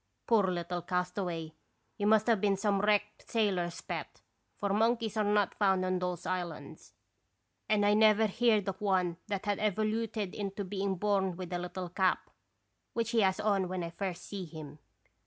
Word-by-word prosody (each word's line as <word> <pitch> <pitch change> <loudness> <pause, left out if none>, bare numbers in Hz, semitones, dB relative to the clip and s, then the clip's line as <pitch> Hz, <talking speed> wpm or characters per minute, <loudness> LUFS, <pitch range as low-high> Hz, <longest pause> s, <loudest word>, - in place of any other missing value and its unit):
Poor 220 -4 +4
little 175 -1 -2
castaway, 180 -2 -2 0.4
he 205 - -2
must 215 0 +5
have 225 -5 +3
been 200 -2 +2
some 200 0 +1
wrecked 210 0 0
sailor's 190 -6 0
pet, - - -6 0.3
for 200 - -1
monkeys 225 +1 +1
are 215 - +2
not 205 -1 +2
found 190 -3 +2
on 185 0 0
those 180 -1 -3
islands, 180 -2 -5 0.8
and 210 -1 +3
I 205 - +5
never 215 0 +5
heerd 215 -1 +2
of 190 0 -4
one 185 -4 +1
that 200 -1 -3
had 205 -1 0
evoluted 215 -1 -1
into 200 0 -4
being 195 0 -2
born 190 -2 0
with 185 -1 -6
a 175 - -1
little 180 0 -5
cap, 185 +1 0 0.6
which 230 0 -1
he 230 -2 +3
has 190 -2 +2
on 200 -3 +1
when 185 -1 -3
I 170 - -5
first 180 0 -4
see 195 -3 -5
him. 155 -2 -10
195 Hz, 175 wpm, -31 LUFS, 180-210 Hz, 0.8 s, must